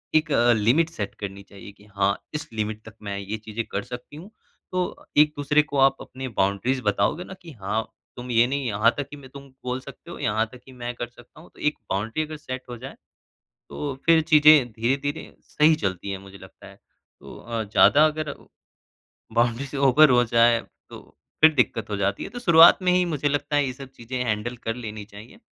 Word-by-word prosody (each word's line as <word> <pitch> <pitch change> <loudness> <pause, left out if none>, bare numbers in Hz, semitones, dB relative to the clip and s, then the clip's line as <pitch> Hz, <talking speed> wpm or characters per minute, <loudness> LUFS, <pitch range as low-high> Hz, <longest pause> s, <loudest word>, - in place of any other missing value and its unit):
एक 155 0 +2 0.2
limit 125 +10 +2
set 105 -11 -5
करनी 100 -1 -7
चाहिए 100 0 -13
कि 105 0 -21
हाँ, 100 -1 0 0.2
इस 150 0 -4
लिमिट 110 0 -3
तक 110 - -11
मैं 100 -1 -4
ये 100 +2 -5
चीज़ें 110 +1 -5
कर 100 - -2
सकती 125 +5 -9
हूँ। 170 +7 -11 0.4
तो 185 -1 -3
एक-दूसरे 150 0 +4
को 145 -1 -5
आप 135 0 +4
अपनी 130 +1 -7
बाउंड्रीज़ 100 +7 +1
बताओगे 105 - 0
ना 190 - -10
कि 170 -2 -11
हाँ, 110 -2 -3 0.3
तुम 125 0 -7
ये 115 +1 +4
नहीं 140 +1 -2
यहाँ 110 +1 +3
तक 145 - -3
कि - - -9
मैं 135 -2 -13
तुम 140 +1 -12 0.2
बोल 125 +1 -3
सकते 140 +6 -12
हो, - - -8
यहाँ 110 +1 0
तक 125 - -14
कि 135 - -14
मैं 120 -1 -6
कर 120 - -5
सकता 120 +3 -18
हूँ 170 - -17
तो - - -20
एक 150 - 0
बाउंड्री 110 +10 -1
अगर 155 0 -8
सेट 130 -2 -7
हो 120 - -6
जाए। 130 +3 -9 0.7
तो 145 -2 -5
फिर 165 -1 +6
चीज़ें 150 -4 +6
धीरे-धीरे 135 +7 -2
सही 155 +1 +3
चलती 95 - -3
हैं 100 - -4
मुझे 95 0 -13
लगता - - -15
है। - - -14 0.4
तो - - -11
अ, 115 -1 -4
ज़्यादा 130 +8 +5
अगर 155 -1 -3 1.0
बाउंड्री 120 +3 +1
से 140 - -7
ऊपर 150 +3 +6
हो 125 -1 +4
जाए 115 0 +4 0.3
तो - - -10 0.4
फिर 155 0 +7
दिक्कत 115 -5 0
हो 105 - -1
जाती 100 0 -1
है। - - -6
तो 245 - -7
शुरुआत 170 -7 +7
में 180 0 +3
ही 180 0 +3
मुझे 150 -4 -1
लगता 145 +1 -1
है 145 - +3
ये 130 - -3
सब 135 +1 -11
चीज़ें 125 +1 -6
हैंडल 115 +2 -2
कर 115 - -1
लेनी 110 -3 -7
चाहिए। 105 +3 -14
125 Hz, 210 wpm, -24 LUFS, 110-150 Hz, 1.0 s, फिर